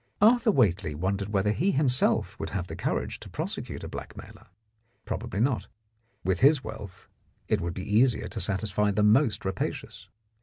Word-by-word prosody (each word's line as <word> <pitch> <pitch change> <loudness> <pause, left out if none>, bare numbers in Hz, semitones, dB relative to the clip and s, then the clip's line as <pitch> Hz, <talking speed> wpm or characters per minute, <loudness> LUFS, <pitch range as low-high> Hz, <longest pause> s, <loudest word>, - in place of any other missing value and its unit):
Arthur 230 +2 +5
Whately 100 - +2
wondered 95 +5 -2
whether 105 0 +1
he 170 - +1
himself 135 -7 +1
would - - -4
have 90 - -3
the - - -7
courage - - -2
to - - -11
prosecute - - -5
a - - -5
Blackmailer. - - -10 0.6
Probably 100 - -4
not; 125 +1 +1 0.6
with 95 0 0
his 140 -1 +5
wealth 100 -3 -9 0.4
it 105 - +1
would 85 0 -3
be 105 +3 -1
easier 125 0 +3
to 110 - -5
satisfy 105 +2 +1
the 105 +1 +1
most 110 +1 +3
rapacious. 95 - -4
105 Hz, 160 wpm, -27 LUFS, 95-130 Hz, 0.6 s, Arthur